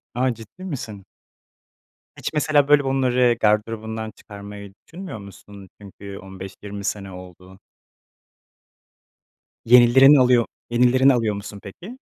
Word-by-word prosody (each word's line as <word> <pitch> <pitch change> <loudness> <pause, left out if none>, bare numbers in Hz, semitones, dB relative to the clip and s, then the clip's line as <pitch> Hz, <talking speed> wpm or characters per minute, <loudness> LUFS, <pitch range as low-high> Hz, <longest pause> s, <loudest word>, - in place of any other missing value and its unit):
A, 130 +1 +1
ciddi 115 - -13
misin? 110 - -7 1.1
Hiç - - -5
mesela, 150 -1 +2
böyle, 145 -1 +4
bunları 125 -3 +1
gardırobundan 110 +1 -1
çıkarmayı 100 -1 -12
düşünmüyor 180 - -9
musun? 100 0 -14
Çünkü 100 0 -11
15-20 95 +1 -10
sene 100 -1 -4
oldu. 90 +1 -13 2.1
Yenilerin 125 +4 +7
oluyo 125 -3 +4 0.2
yenilerini 125 +3 +3
alıyor 115 -4 -1
musun 100 0 -9
peki? 190 - -11
110 Hz, 105 wpm, -21 LUFS, 100-130 Hz, 2.1 s, Yenilerin